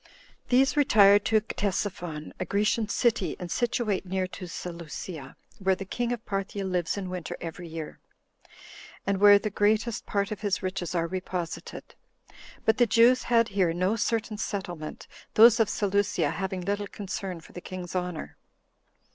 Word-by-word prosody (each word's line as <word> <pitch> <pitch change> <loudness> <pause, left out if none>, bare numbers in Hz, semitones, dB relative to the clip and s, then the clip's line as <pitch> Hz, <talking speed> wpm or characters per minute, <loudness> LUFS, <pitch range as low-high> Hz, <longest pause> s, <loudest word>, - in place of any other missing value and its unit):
These 265 +2 +4
retired 205 -8 +6
to 220 -1 +3
Ctesiphon, 180 -7 -3
a 185 - -2
Grecian 210 +2 +1
city, 230 -3 +1
and 175 -1 -6
situate 235 -4 0
near 190 0 -1
to 185 -1 -8
Seleucia, 170 -4 -7 0.2
where 190 -1 +2
the 195 - -7
king 240 +5 -2
[of 240 -2 -4
Parthia] 195 0 -3
lives 180 -1 -1
in 195 -2 -4
winter 180 -2 -5
every 170 +1 -7
year, 160 -1 -7 1.1
and 195 -1 0
where 205 0 +8
the 205 +1 -3
greatest 215 +3 +1
part 200 +1 -1
of 210 - -5
his 205 -2 -1
riches 185 -2 -3
are 165 -1 +1
reposited; 180 -1 -5 0.7
but 220 +2 +3
the 240 - +5
Jews 235 +4 +5
had 230 -1 +4
here 185 -4 +1
no 185 +5 +1
certain 225 -1 -1
settlement, 175 -8 -5 0.3
those 230 +1 +8
of 220 -3 +3
Seleucia 205 0 +1
having 190 +2 -3
little 200 +2 -2
concern 195 -3 -5
for 165 - -16
the 175 - -8
king's 180 -1 -7
honor. 180 -3 -4
195 Hz, 155 wpm, -27 LUFS, 180-215 Hz, 1.1 s, where